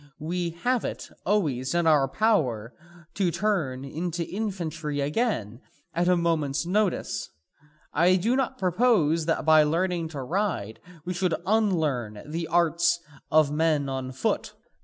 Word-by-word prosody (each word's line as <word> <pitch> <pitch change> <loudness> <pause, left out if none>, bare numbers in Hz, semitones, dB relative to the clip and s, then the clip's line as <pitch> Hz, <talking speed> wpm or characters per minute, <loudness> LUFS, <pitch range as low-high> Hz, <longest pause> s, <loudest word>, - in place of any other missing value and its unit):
We 170 +3 -2
have 250 -1 +2
it - - -5 0.2
always 150 -9 0
in 175 -1 +2
our 150 -4 +4
power 130 - +1 0.4
to 190 -3 +1
turn 160 -10 -1
into 170 +4 -3
infantry 170 -8 -3
again 140 - -1 0.3
at 175 +1 +1
a 180 -1 +4
moment's 165 -3 0
notice. 200 +1 -1 0.6
I 175 +5 +4
do 220 +7 +1
not 265 -2 -1
propose 180 -5 +2
that 165 - 0
by 155 -1 +7
learning 170 +2 0
to 145 -4 -6
ride 165 - -2 0.3
we 180 - -2
should 175 -2 0
unlearn 155 - 0
the 165 +2 -4
arts 170 0 +2 0.3
of 155 -2 +4
men 150 -2 +1
on 130 -1 -4
foot." 130 0 -2
165 Hz, 140 wpm, -26 LUFS, 145-185 Hz, 0.6 s, by